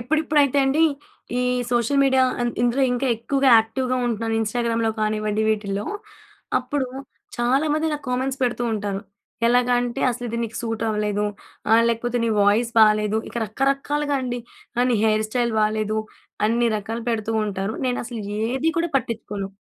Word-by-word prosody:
ఇప్పుడిప్పుడైతే 285 +1 +2
అండి 275 +4 +2 0.6
ఈ - - +1 0.3
social 240 +3 +1
media 265 -1 +4 0.2
అం 240 - +1
ఇందులో 245 +3 +2
ఇంకా 255 +2 -1
ఎక్కువగా 270 +4 +1
యాక్టివ్‍గా 255 +3 -1
ఉంటున్నాను. 225 -1 -1
ఇన్స్టాగ్రామ్‍లో 230 0 0
కానివ్వండి 215 0 0
వీటిల్లో. 205 -1 -1 0.7
అప్పుడు 285 -3 -2 0.5
చాలామంది 295 +6 +1
నాకు 295 -1 -5
కామెంట్స్ 260 +2 -1
పెడుతూ 245 -1 0
ఉంటారు. 205 -2 -2 0.5
ఎలాగా 245 +1 +3
అంటే, 245 -1 -3
"అసలు 245 +1 -5
ఇది 235 +1 -3
నీకు 225 -1 -7
సూట్ 225 -1 -3
అవ్వలేదు". 210 -1 0 0.5
ఆహ్, 225 +1 +6
లేకపోతే, 235 +1 -1
"నీ - - +1
వాయిస్ 210 +4 +3
బాలేదు". 215 0 +4
ఇక - - -13
రకరకాలుగా 275 +5 0
అండి. 245 -1 -3 0.4
ఆహ్, 245 - +3
"నీ 240 - +3
హెయిర్ 215 0 +2
స్టైల్ 240 0 0
బాలేదు" 215 0 0 0.5
అన్ని 235 +2 +2
రకాలు 225 +3 -5
పెడుతూ 225 -1 -2
ఉంటారు. 200 +1 -3
నేనసలు 240 -2 -3 0.2
ఏది 265 +7 0
కూడా 340 +1 0
పట్టించుకోను. 210 -5 -3
235 Hz, 145 wpm, -23 LUFS, 215-260 Hz, 0.7 s, ఆహ్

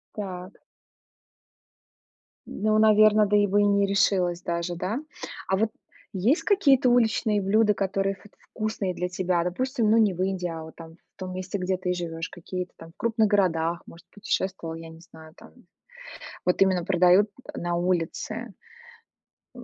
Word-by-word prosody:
Так. 185 -2 -7 1.9
Ну, 215 +1 0
наверно, 215 0 +5
да, 205 +1 +1
и 205 0 +4
бы 205 +1 +2
и 205 - +3
не 200 0 +3
решилась 185 -3 +1
даже, 170 0 -3
да? 190 +8 -3 0.5
А 190 - +2
вот 220 +2 +1 0.4
есть 220 - +1
какие-то 280 -11 +4
уличные 220 -3 +2
блюда, 210 +2 +3
которые 195 0 -1
вот 210 - -18
вкусные 215 -3 -4
для 180 0 -2
тебя? 180 -1 0
Допустим, 225 +5 0
ну, 225 - +5
не 210 -4 +4
в 175 - -5
Индии, 190 -2 -2
а 165 -1 -6
вот 160 - -12
там 165 -1 -11
в - - -39
том 185 0 -5
месте, 185 +2 -4
где 185 0 -1
ты 180 0 -2
живешь. 165 -1 -5
Какие-то 180 +1 -6
там 165 0 -12
в - - -32
крупных 225 -1 +1
городах, 175 -4 +1
может, 170 - -15
путешествовала, 190 -5 -3
я 165 0 -9
не 160 0 -14
знаю, 160 -4 -15
там. - - -16 0.9
Вот 180 - +1
именно 185 -3 +3
продают 185 +2 +4 0.3
на 175 0 -2
улице. 185 +6 -2 1.0
М. 245 - -10
190 Hz, 160 wpm, -25 LUFS, 175-210 Hz, 1.9 s, наверно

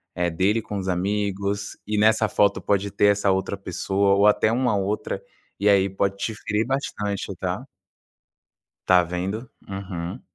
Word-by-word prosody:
eh, 90 -1 +1
dele 95 +7 +1
com 105 -2 -5
os 95 - -5
amigos 100 +2 -1
e 105 0 -1
nessa 110 +1 +4
foto 100 -1 +2
pode 100 0 0
ter 100 +1 +3
essa 100 -1 +3
outra 95 +1 -1
pessoa 100 +1 +1
ou 100 +1 +4
até 105 +1 +4
uma 125 -2 +1
outra, 100 +2 -2 0.4
e 100 - +1
aí, 100 -1 +4
pode 100 +1 -1
te 105 +3 -2
ferir 105 +1 -1
bastante, 105 -6 -3
tá? - - -3 1.2
Tá 90 -1 +6
vendo? 95 +7 -4 0.2
Uhum. 95 +1 -5
100 Hz, 155 wpm, -24 LUFS, 95-105 Hz, 1.2 s, Tá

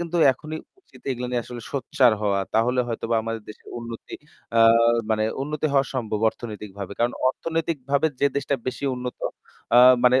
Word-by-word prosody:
কিন্তু 170 0 -3 0.2
এখনই 155 +4 -7 0.2
উচিত - - -20
এগুলা 125 -1 -3
নিয়ে 120 -1 0
আসলে 120 -1 -8
সচ্ছার 130 -3 +3
হওয়া। 100 -2 +1
তাহলে 125 +3 +3
হয়তোবা 115 0 -1
আমাদের 115 -1 -4
দেশের 105 - -12
উন্নতি 115 -1 -8 0.4
আ - - +5 0.5
মানে 110 0 +2 0.2
উন্নতি 150 +1 -2
হওয়া 135 -1 +4
সম্ভব 110 -4 -2
অর্থনৈতিকভাবে। 100 -4 -8
কারণ 120 +1 +2 0.2
অর্থনৈতিকভাবে 155 -2 -1
যে 140 - +5
দেশটা 140 0 0
বেশি 130 +2 -3
উন্নত 125 0 -6 0.6
আ - - +9 0.3
মানে 125 +1 +6
125 Hz, 160 wpm, -24 LUFS, 115-140 Hz, 0.6 s, আ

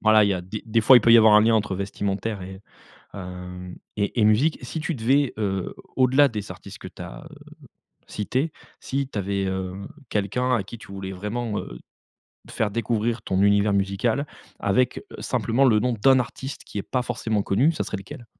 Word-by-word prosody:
Voilà, 110 -1 +5
il - - +2
y 100 - +2
a 90 - -3
des 95 +4 -7
des 115 +1 +2
fois 125 +4 +8
il - - +7
peut 115 +1 +5
y - - +10
avoir 110 -1 +7
un 105 - +8
lien 115 +1 +4
entre 105 -3 0
vestimentaire 100 +1 -3
et 95 +1 -9 0.5
hem, 90 -1 -8 0.2
et 100 +3 -1
et - - +4
musique. 115 +10 +3
Si 140 +6 -5
tu 160 +2 -2
devais 135 +3 +2
heu, 95 -3 -2 0.2
au-delà 130 +2 +5
des 105 -5 -6
artistes - - -10
que - - -8
tu - - -11
as - - -9
heu, - - -13 0.7
cités, 130 +9 -2 0.3
si 135 0 -2
tu 110 - -5
avais 100 0 -1
heu, 95 -1 -3 0.4
quelqu'un 120 +5 0
à 105 - -1
qui 115 +5 -10
tu 100 - -12
voulais 95 -1 -6
vraiment 105 +3 -3
heu, - - -7 0.7
faire 110 -2 -1
découvrir 115 +1 -1
ton 95 -3 0
univers 100 +1 +4
musical 100 +8 0 0.3
avec 125 +6 +1 0.2
simplement 125 +4 +1
le 110 -5 +5
nom 125 +3 0
d'un 130 +4 +4
artiste 130 +2 -5
qui - - -9
est - - 0
pas 130 - -1
forcément 110 -4 -1
connu, 120 +13 +3
ça - - -2
serait 105 - -4
lequel? 95 +5 -10
110 Hz, 200 wpm, -24 LUFS, 100-125 Hz, 0.7 s, y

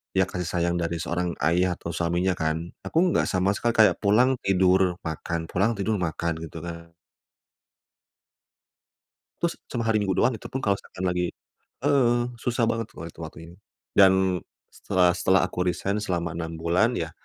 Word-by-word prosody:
iya 95 - +5
kasih 90 -1 -4
sayang 85 0 0
dari 85 -1 -2
seorang 85 +2 -1 0.2
ayah 90 +2 +2
atau - - -6
suaminya 85 +2 0
kan. 80 -1 0 0.3
Aku - - -3
enggak 175 - +2
sama 95 0 +1
sekali 120 +3 0
kayak - - 0
pulang 120 +6 +4
tidur, 95 -1 +3
makan, 80 +1 -4
pulang 100 +7 +1
tidur, 105 +2 0
makan 85 -2 -1
gitu 80 0 -7
kan. 85 0 -8 2.5
Terus 170 0 +1 0.2
cuma 120 - -2
hari 110 -1 +3
Minggu 95 -2 0
doang. 120 +7 +2
itu 110 - -8
pun 135 - -4
kalau 100 -1 +2
seakan 95 - -8
lagi 90 0 -1 0.5
heeh, 135 -4 +4 0.2
susah 120 0 -1
banget 115 -1 -1
kalau 80 - -9
lihat 85 - -11
waktu 80 -1 -8
ini. - - -15 0.4
Dan 95 -2 +7 0.6
setelah 90 -1 +2
setelah 95 +1 +3
aku 90 - -8
resign 95 +3 -1
selama 85 -5 -2
6 80 -1 -4
bulan, 90 +9 +2
iya. 85 0 -3
90 Hz, 165 wpm, -25 LUFS, 85-105 Hz, 2.5 s, Dan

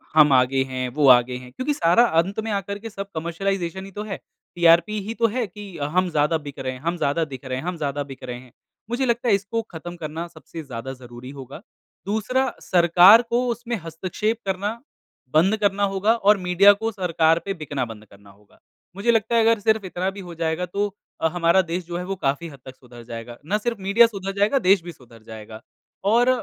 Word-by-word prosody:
हम 150 -2 +7
आगे 130 +1 +3
हैं, 130 -1 -3
वो 140 +3 +2
आगे 125 +1 -1
हैं 125 0 -12
क्योंकि 255 - -2
सारा 235 -2 +4 0.2
अंत 195 +5 -5
में - - -2
आकर 200 +1 -6
के - - -4
सब 200 -1 -7
कमर्शियलाइज़ेशन 175 +2 -3
ही 195 - -11
तो - - -3
है - - -4 0.4
टीआरपी 175 +5 +4
ही 225 - -3
तो - - +7
है 250 - 0
कि 205 +2 -10 0.3
हम 185 -1 +3
ज़्यादा 150 +1 +1
बिक 140 - -8
रहे 130 -1 -3
हैं, 130 - -10
हम 170 +3 -2
ज़्यादा 160 +2 0
दिख 130 +1 -9
रहे 130 0 -3
हैं, 130 - -6
हम 180 -1 -3
ज़्यादा 145 -2 -2
बिक 130 - -11
रहे 125 -1 -6
हैं। 125 -1 -17 0.4
मुझे 245 +3 0
लगता 240 0 0
है 200 - +5
इसको 205 +4 -2
ख़त्म 175 +2 -7
करना 160 +3 -4
सबसे 165 0 -10
ज़्यादा 130 -1 -6
ज़रूरी 120 +1 -10
होगा। 135 +6 -9 0.4
दूसरा 220 +6 0 0.2
सरकार 180 +5 +7
को 245 +1 +1
उसमें 235 0 -4
हस्तक्षेप 185 +7 -3
करना, 195 +2 -1 0.6
बंद 185 +8 +4
करना 205 0 +2
होगा 205 +4 +3
और 210 -2 +4
मीडिया 200 +3 +7
को 225 0 -1
सरकार 165 -4 +2
पे 195 - -2
बिकना 140 -3 -2
बंद 110 -1 -12
करना 100 0 -19
होगा। 100 +1 -25 0.4
मुझे 205 +4 +2
लगता 225 +1 +1
है 230 - +5
अगर 225 -1 +3
सिर्फ़ 220 -1 +1
इतना 185 +1 -2
भी - - -8
हो 170 - -8
जाएगा 165 +2 -1
तो 200 +4 -1 0.3
अ, 160 - +3
हमारा 175 +1 +4
देश 175 +1 -3
जो 175 0 -5
है 180 - -4
वो 195 +1 -3
काफ़ी 155 -1 -1
हद 140 -3 -13
तक 130 0 -10
सुधार 120 -2 -14
जाएगा 115 +1 -8
ना 200 +6 +1
सिर्फ़ 230 0 -3
मीडिया 200 +5 +5
सुधार 195 -3 -5
जाएगा 205 +7 +2
देश 190 0 +5
भी 175 - -7
सुधार 120 -6 -18
जाएगा 110 0 -10 0.5
और 240 +2 +4
175 Hz, 220 wpm, -23 LUFS, 140-205 Hz, 0.6 s, हम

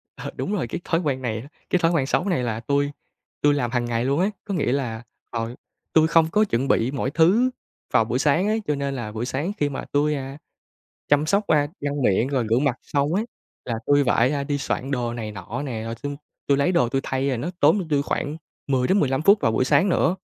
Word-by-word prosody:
Ờ, - - -6
đúng 200 - -3
rồi 180 - -1
cái 140 - -5
thói 165 - +1
quen 140 -5 -1
này 110 -3 -2
á, 130 - -11 0.2
cái 180 - +2
thói 165 -1 +3
quen 160 -6 +1
xấu 150 - 0
này 170 -9 +1
là 115 -2 -2
tui 140 +4 0 0.5
tui 145 0 +4
làm 125 -5 -1
hằng 120 -1 0
ngày 120 0 -1
luôn 140 +3 +1
ấy. 195 +4 +2
Có 200 - -3
nghĩa 150 -8 0
là, 120 -5 -2 0.3
ờ, 115 +1 -4 0.4
tui 160 0 +5
không 165 -1 +4
có 215 +3 +4
chuẩn 135 - -1
bị 125 -1 +2
mọi 135 -1 -2
thứ 190 - +4 0.4
vào 110 - +4
buổi 120 +3 -1
sáng 155 +8 +2
ấy, 220 +1 +1
cho 150 - +1
nên 140 -1 -2
là 120 -4 -5
buổi 110 +2 -3
sáng 145 +9 -2
khi 145 - +1
mà 135 - -5
tui, 150 +1 +2
a, 135 0 -6 0.7
chăm 145 +1 +3
sóc, 200 +5 +1
a, 150 -2 +3
răng 145 0 -2
miệng, 115 +2 +2
rồi 130 -5 0
rửa 115 - +4
mặt 135 -2 +1
xong 145 +3 0
á 200 - +2 0.4
là 120 - -2
tui 145 0 +4
phải, 125 +1 +3
a, 140 -1 -1
đi 145 0 -1
soạn 135 -1 -3
đồ 120 -3 -1
này 110 -3 -5
nọ 100 +6 -6
nè, 120 -6 -4
rồi 115 0 -4
tui 145 0 -3 0.3
tui 140 - +3
lấy 140 +6 +2
đồ 125 -9 +3
tui 135 +2 0
thay 130 +1 -1
rồi 130 -3 -1
nó 150 +9 -3
tốn - - +5
cho 190 - -2
tôi 145 -2 +2
khoảng 145 +1 -2 0.3
10 130 -2 +1
đến 195 +1 +4
15 135 0 +1
phút 200 +5 +6
vào 115 - +2
buổi 120 - +2
sáng 145 +8 +3
nữa. 180 0 +2
140 Hz, 255 wpm, -23 LUFS, 125-155 Hz, 0.7 s, phút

